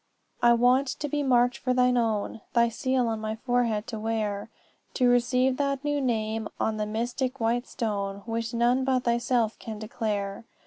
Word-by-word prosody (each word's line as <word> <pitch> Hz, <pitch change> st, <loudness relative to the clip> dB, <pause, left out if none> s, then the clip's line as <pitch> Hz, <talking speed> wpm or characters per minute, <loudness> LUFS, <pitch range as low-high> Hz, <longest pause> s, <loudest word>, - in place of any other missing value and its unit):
"'I 240 Hz, 0 st, +6 dB
want 250 Hz, +3 st, +4 dB
to 295 Hz, +3 st, -3 dB
be 290 Hz, +1 st, -1 dB
marked 245 Hz, -2 st, +3 dB
for 255 Hz, -1 st, 0 dB
thine 250 Hz, 0 st, +3 dB
own 225 Hz, -2 st, -1 dB
Thy 235 Hz, -1 st, +4 dB
seal 255 Hz, +1 st, 0 dB
on 225 Hz, -1 st, -2 dB
my 215 Hz, 0 st, -3 dB
forehead 230 Hz, -2 st, 0 dB
to 225 Hz, -2 st, -5 dB
wear; 215 Hz, -1 st, -2 dB, 0.5 s
To 250 Hz, -, +3 dB
receive 250 Hz, +1 st, +3 dB
that 275 Hz, -1 st, -1 dB
new 290 Hz, -1 st, 0 dB
name 220 Hz, -3 st, -1 dB
on 220 Hz, -1 st, 0 dB
the 210 Hz, 0 st, -2 dB
mystic 245 Hz, +4 st, -2 dB
white 235 Hz, +2 st, 0 dB
stone 200 Hz, -3 st, -3 dB
Which 230 Hz, 0 st, -3 dB
none 240 Hz, +2 st, +2 dB
but 260 Hz, -1 st, +1 dB
thyself 235 Hz, -1 st, +1 dB
can 220 Hz, -2 st, -7 dB
declare. 210 Hz, -2 st, -3 dB
235 Hz, 175 wpm, -27 LUFS, 220-255 Hz, 0.5 s, I